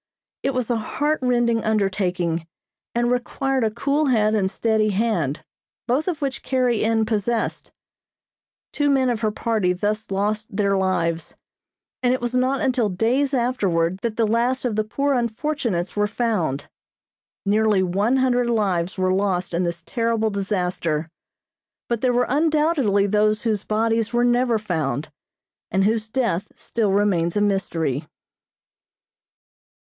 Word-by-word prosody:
It 275 Hz, -1 st, -1 dB
was 250 Hz, -1 st, -1 dB
a 235 Hz, -, +1 dB
heart 295 Hz, +7 st, -1 dB
rending 240 Hz, -2 st, +2 dB
undertaking 185 Hz, -6 st, 0 dB, 0.5 s
and 240 Hz, +1 st, +1 dB
required 260 Hz, +1 st, 0 dB
a 220 Hz, -, +2 dB
cool 280 Hz, +7 st, 0 dB
head 215 Hz, -4 st, +3 dB
and 195 Hz, -3 st, +1 dB
steady 220 Hz, 0 st, +1 dB
hand, 190 Hz, -, 0 dB, 0.4 s
both 260 Hz, +7 st, 0 dB
of 320 Hz, -5 st, -2 dB
which 270 Hz, -1 st, -2 dB
Carrie 250 Hz, -4 st, +1 dB
N. 225 Hz, 0 st, +2 dB
possessed. 220 Hz, +1 st, -1 dB, 1.0 s
Two 290 Hz, -1 st, +1 dB
men 265 Hz, -2 st, +3 dB
of 230 Hz, -, -2 dB
her 215 Hz, -1 st, +1 dB
party 210 Hz, -4 st, 0 dB
thus 210 Hz, +3 st, -2 dB
lost 210 Hz, +2 st, -1 dB
their 200 Hz, -1 st, +2 dB
lives, 175 Hz, -4 st, -1 dB, 0.7 s
and 250 Hz, 0 st, +3 dB
it -, -, -4 dB
was 240 Hz, +1 st, -2 dB
not 260 Hz, +2 st, +1 dB
until 250 Hz, -5 st, +1 dB
days 240 Hz, +9 st, +1 dB
afterward 190 Hz, -8 st, 0 dB
that 225 Hz, +1 st, -3 dB
the 230 Hz, -, +3 dB
last 240 Hz, +4 st, +1 dB
of 235 Hz, -4 st, 0 dB
the 215 Hz, -, +1 dB
poor 280 Hz, +6 st, 0 dB
unfortunates 235 Hz, -, -1 dB
were 210 Hz, 0 st, +2 dB
found. 210 Hz, -, -1 dB, 0.8 s
Nearly 210 Hz, -1 st, +3 dB
one 200 Hz, +8 st, +1 dB
hundred 245 Hz, -2 st, +2 dB
lives 190 Hz, -6 st, 0 dB
were 185 Hz, 0 st, +1 dB
lost 190 Hz, -2 st, 0 dB
in 175 Hz, +2 st, +1 dB
this 170 Hz, -1 st, -4 dB
terrible 230 Hz, -2 st, 0 dB
disaster, 180 Hz, -5 st, -2 dB, 0.8 s
but 235 Hz, -2 st, -1 dB
there 255 Hz, -, +2 dB
were 245 Hz, 0 st, +2 dB
undoubtedly 295 Hz, -8 st, +2 dB
those 210 Hz, +1 st, +2 dB
whose 215 Hz, -3 st, 0 dB
bodies 225 Hz, +1 st, 0 dB
were 240 Hz, 0 st, +2 dB
never 240 Hz, -1 st, +2 dB
found, 160 Hz, -7 st, -2 dB, 0.6 s
and 190 Hz, 0 st, +1 dB
whose 220 Hz, +1 st, +1 dB
death 225 Hz, -7 st, -1 dB
still 220 Hz, -4 st, -1 dB
remains 190 Hz, -3 st, +1 dB
a -, -, +2 dB
mystery. 165 Hz, -8 st, 0 dB
220 Hz, 145 wpm, -22 LUFS, 190-245 Hz, 1.0 s, head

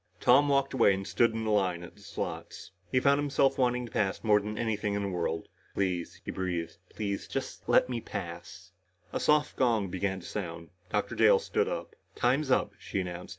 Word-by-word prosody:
Tom 145 Hz, +1 st, +5 dB
walked 140 Hz, -1 st, +2 dB
away 115 Hz, -6 st, +5 dB
and 95 Hz, 0 st, -5 dB
stood 115 Hz, +3 st, +3 dB
in 110 Hz, 0 st, -3 dB
the 110 Hz, -, 0 dB
line 90 Hz, -4 st, +1 dB
at 85 Hz, -, -11 dB
the -, -, -19 dB
slots. -, -, -6 dB, 0.2 s
He 130 Hz, -, +4 dB
found 140 Hz, +2 st, +4 dB
himself 140 Hz, -1 st, +2 dB
wanting 125 Hz, -1 st, +2 dB
to 115 Hz, -, -11 dB
pass 95 Hz, -2 st, -1 dB
more 105 Hz, -2 st, +5 dB
than 105 Hz, +1 st, -5 dB
anything 105 Hz, -3 st, -1 dB
in 100 Hz, -, -1 dB
the 100 Hz, -, -1 dB
world. 85 Hz, -3 st, -2 dB, 0.3 s
"Please," 90 Hz, -3 st, -1 dB
he -, -, -3 dB
breathed, 85 Hz, -3 st, -3 dB
"please, 100 Hz, -2 st, -3 dB
just -, -, -5 dB
let -, -, +5 dB
me 120 Hz, -2 st, -3 dB
pass 90 Hz, 0 st, -7 dB, 0.2 s
" 90 Hz, -1 st, -34 dB
A -, -, 0 dB
soft 150 Hz, 0 st, +2 dB
gong 115 Hz, -6 st, +2 dB
began 95 Hz, +1 st, -2 dB
to -, -, -13 dB
sound. 85 Hz, -5 st, -5 dB, 0.2 s
Dr. -, -, -1 dB
Dale -, -, +6 dB
stood 445 Hz, -1 st, 0 dB
up. -, -, -4 dB, 0.2 s
"Time's 135 Hz, +4 st, +1 dB
up," 130 Hz, -, +2 dB
she -, -, -3 dB
announced. 90 Hz, -1 st, -6 dB
105 Hz, 205 wpm, -30 LUFS, 95-130 Hz, 0.3 s, Dale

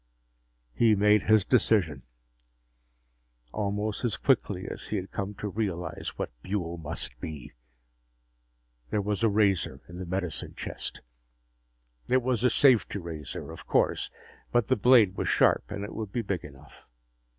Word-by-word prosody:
He 110 Hz, -, +4 dB
made 105 Hz, +1 st, +4 dB
his 110 Hz, -2 st, +4 dB
decision, 95 Hz, -, +2 dB, 1.5 s
almost 105 Hz, +2 st, -2 dB
as 115 Hz, -5 st, 0 dB
quickly 100 Hz, -8 st, +1 dB
as -, -, -7 dB
he -, -, -3 dB
had 95 Hz, -1 st, -4 dB
come 100 Hz, +1 st, -4 dB
to 105 Hz, -, -4 dB
realize 95 Hz, -5 st, -3 dB
what -, -, -3 dB
Buehl 85 Hz, -4 st, -3 dB
must 65 Hz, -5 st, -4 dB
be. 75 Hz, -2 st, -7 dB, 1.4 s
There 105 Hz, -, 0 dB
was 105 Hz, +1 st, -1 dB
a 115 Hz, -, +4 dB
razor 100 Hz, -10 st, +1 dB
in 90 Hz, 0 st, -9 dB
the 95 Hz, -, -5 dB
medicine 90 Hz, -2 st, -3 dB
chest. -, -, -6 dB, 1.1 s
It 130 Hz, 0 st, +3 dB
was 125 Hz, -2 st, +1 dB
a 125 Hz, -, +5 dB
safety 125 Hz, -4 st, +4 dB
razor, 80 Hz, -6 st, -6 dB
of -, -, -11 dB
course, -, -, +1 dB, 0.4 s
but 120 Hz, -4 st, +2 dB
the -, -, +4 dB
blade 110 Hz, -4 st, +5 dB
was -, -, -1 dB
sharp -, -, +3 dB
and 100 Hz, -, -5 dB
it 105 Hz, -, -6 dB
would 110 Hz, -3 st, -5 dB
be 120 Hz, +1 st, -2 dB
big 100 Hz, -3 st, -2 dB
enough. 70 Hz, 0 st, -14 dB
100 Hz, 150 wpm, -28 LUFS, 90-110 Hz, 1.5 s, a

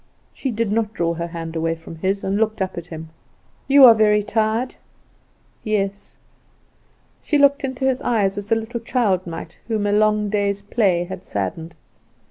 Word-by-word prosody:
She 270 Hz, -, -3 dB
did 230 Hz, -3 st, -1 dB
not 220 Hz, 0 st, -1 dB
draw 170 Hz, -1 st, 0 dB
her 170 Hz, 0 st, -4 dB
hand 165 Hz, -1 st, -7 dB
away 165 Hz, 0 st, 0 dB
from 165 Hz, 0 st, -11 dB
his, 195 Hz, +4 st, -1 dB
and 195 Hz, +1 st, 0 dB
looked 220 Hz, 0 st, 0 dB
up 190 Hz, -1 st, -2 dB
at 170 Hz, 0 st, -7 dB
him. 160 Hz, -1 st, -8 dB, 0.6 s
"You 275 Hz, -1 st, +8 dB
are 235 Hz, -, +10 dB
very 210 Hz, -1 st, +3 dB
tired?" 220 Hz, +4 st, 0 dB, 0.9 s
"Yes." 200 Hz, -2 st, -2 dB, 1.1 s
She 300 Hz, -, +1 dB
looked 280 Hz, +1 st, +4 dB
into 265 Hz, 0 st, -3 dB
his 265 Hz, -1 st, +1 dB
eyes 205 Hz, -5 st, +1 dB
as 205 Hz, +1 st, -6 dB
a -, -, +6 dB
little 225 Hz, +2 st, -4 dB
child 215 Hz, -6 st, 0 dB
might 165 Hz, -, -8 dB
whom 220 Hz, -3 st, -1 dB
a 205 Hz, -, +1 dB
long 210 Hz, 0 st, +2 dB
day's 200 Hz, -1 st, 0 dB
play 200 Hz, -5 st, +1 dB
had 185 Hz, +1 st, -8 dB
saddened. 160 Hz, -, -4 dB
205 Hz, 175 wpm, -21 LUFS, 175-225 Hz, 1.1 s, are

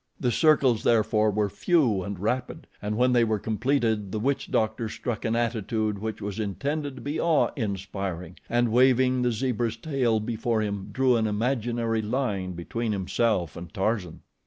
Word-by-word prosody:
The 125 Hz, -, +1 dB
circles 135 Hz, -3 st, +4 dB
therefore 110 Hz, -1 st, +3 dB
were 105 Hz, 0 st, +1 dB
few 120 Hz, -, +2 dB
and 100 Hz, +1 st, -5 dB
rapid, 125 Hz, -, -2 dB, 0.2 s
and 105 Hz, +1 st, -2 dB
when 125 Hz, +1 st, +3 dB
they 120 Hz, -1 st, +5 dB
were 110 Hz, -1 st, +1 dB
completed, 110 Hz, -2 st, 0 dB
the 110 Hz, -, -2 dB
witch 135 Hz, +5 st, -1 dB
doctor 110 Hz, +1 st, 0 dB
struck 115 Hz, 0 st, -4 dB
an 115 Hz, 0 st, +1 dB
attitude 110 Hz, -2 st, -1 dB
which 110 Hz, 0 st, -5 dB
was 100 Hz, +1 st, -4 dB
intended 140 Hz, +8 st, -2 dB
to 130 Hz, -, -10 dB
be 145 Hz, +2 st, -2 dB
awe 165 Hz, -3 st, +3 dB
inspiring 95 Hz, -, -4 dB
and 120 Hz, -1 st, +2 dB
waving 130 Hz, +1 st, +4 dB
the 125 Hz, -1 st, +2 dB
zebra's 120 Hz, -1 st, -1 dB
tail 125 Hz, -4 st, 0 dB
before 115 Hz, 0 st, -1 dB
him, 100 Hz, -2 st, -3 dB
drew 130 Hz, -2 st, +3 dB
an 110 Hz, -1 st, +1 dB
imaginary 115 Hz, 0 st, 0 dB
line 105 Hz, -5 st, -2 dB
between 110 Hz, +6 st, -3 dB
himself 95 Hz, -2 st, 0 dB
and 85 Hz, -1 st, -8 dB
Tarzan. 95 Hz, -3 st, -1 dB
110 Hz, 165 wpm, -26 LUFS, 105-125 Hz, 0.2 s, they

